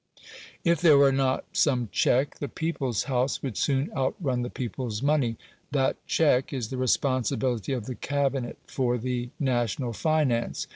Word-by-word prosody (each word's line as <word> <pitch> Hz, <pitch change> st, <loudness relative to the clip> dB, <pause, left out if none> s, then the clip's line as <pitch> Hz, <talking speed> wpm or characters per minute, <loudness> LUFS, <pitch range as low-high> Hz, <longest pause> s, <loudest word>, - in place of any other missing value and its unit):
If 170 Hz, -3 st, +2 dB
there 155 Hz, -5 st, +7 dB
were 140 Hz, -1 st, +6 dB
not 135 Hz, -1 st, +1 dB
some 125 Hz, -5 st, +2 dB
check, 135 Hz, +3 st, +1 dB
the 145 Hz, -, -3 dB
"people's 135 Hz, -7 st, -2 dB
house" 130 Hz, -1 st, -1 dB
would 130 Hz, -6 st, -3 dB
soon 135 Hz, +5 st, 0 dB
outrun 130 Hz, -1 st, -1 dB
the 120 Hz, -, -3 dB
people's 120 Hz, -2 st, -4 dB
money. 140 Hz, -6 st, +1 dB, 0.3 s
That 135 Hz, -2 st, +1 dB
check 135 Hz, -5 st, +2 dB
is 125 Hz, -6 st, -3 dB
the 130 Hz, -, -4 dB
responsibility 130 Hz, -2 st, 0 dB
of 125 Hz, -5 st, -2 dB
the 130 Hz, -, -4 dB
Cabinet 135 Hz, -2 st, -1 dB
for 125 Hz, -2 st, 0 dB
the 125 Hz, 0 st, -3 dB
national 120 Hz, -2 st, 0 dB
finance. 145 Hz, -4 st, 0 dB
130 Hz, 150 wpm, -27 LUFS, 120-140 Hz, 0.3 s, there